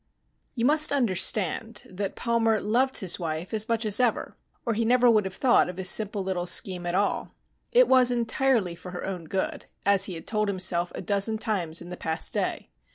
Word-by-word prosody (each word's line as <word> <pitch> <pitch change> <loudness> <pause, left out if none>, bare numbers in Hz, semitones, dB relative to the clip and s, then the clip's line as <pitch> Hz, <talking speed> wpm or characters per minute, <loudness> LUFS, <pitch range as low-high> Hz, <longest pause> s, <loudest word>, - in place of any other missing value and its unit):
You 235 -2 0
must 305 +2 +5
understand 215 - -1
that 190 +1 -5
Palmer 225 -2 +1
loved 250 +6 +1
his 185 -3 0
wife 165 +3 -4
as 220 +1 -1
much 230 -1 0
as 210 +1 +3
ever, 245 -3 0 0.3
or 230 - 0
he 225 - -1
would 225 - 0
never 245 -1 +4
have 190 -1 -6
thought 250 -7 +3
of 180 - -8
his 190 0 0
simple 205 -2 -1
little 180 -2 -3
scheme 180 0 -1
at 175 - -1
all. 205 +2 -1 0.4
It - - +5
was 255 -1 +5
entirely 235 -4 +1
for 175 +2 -11
her 180 - -5
own 185 -4 -5
good, 190 +4 -3 0.2
as 200 -1 +4
he 185 - -5
had 165 - -9
told 215 -1 -1
himself 180 -3 +1
a - - -6
dozen 200 +4 0
times 180 -7 -2
in 175 - -11
the 180 - -6
past 160 0 -2
day. - - -3
205 Hz, 205 wpm, -26 LUFS, 180-235 Hz, 0.4 s, must